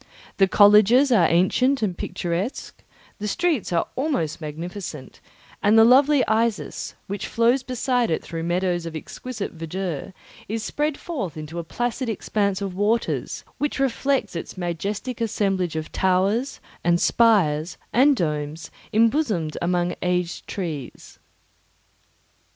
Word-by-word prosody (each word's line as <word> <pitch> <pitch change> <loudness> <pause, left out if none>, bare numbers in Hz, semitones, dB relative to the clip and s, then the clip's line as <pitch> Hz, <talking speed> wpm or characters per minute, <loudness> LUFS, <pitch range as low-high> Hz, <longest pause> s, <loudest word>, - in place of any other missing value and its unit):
The 195 - +5
colleges 210 +7 +6
are 185 -9 +5
ancient 240 +10 +2
and 190 -4 0
picturesque; 180 +7 -4 0.4
the 210 - -3
streets 320 - 0
are 170 -1 +1
almost 260 - -1
magnificent; 155 -2 -7 0.4
and 210 +2 +4
the 225 - +8
lovely 270 +3 +5
Isis, 220 -1 -1
which 200 0 -4
flows 235 +3 +2
beside 250 -1 0
it 160 - -1
through 165 -1 -5
meadows 175 0 -1
of 165 - -7
exquisite 220 +7 -6
verdure, 165 0 -5 0.4
is 220 0 -2
spread 295 +2 -1
forth 215 - -5
into 155 +2 -6
a - - -4
placid 240 +7 -3
expanse 200 -2 -1
of 195 -2 -4
waters, 210 +5 -1 0.2
which 295 - -1
reflects 270 -5 0
its 170 - -6
majestic 200 +8 -3
assemblage 195 -6 0
of 155 -1 -4
towers, 195 +8 +1 0.2
and 175 0 +3
spires, 175 -10 +3 0.2
and 275 +5 +5
domes, 150 - -3 0.2
embosomed 220 - +1
among 175 0 0
aged 180 -1 -1
trees. 155 - -6
200 Hz, 130 wpm, -23 LUFS, 170-235 Hz, 0.4 s, the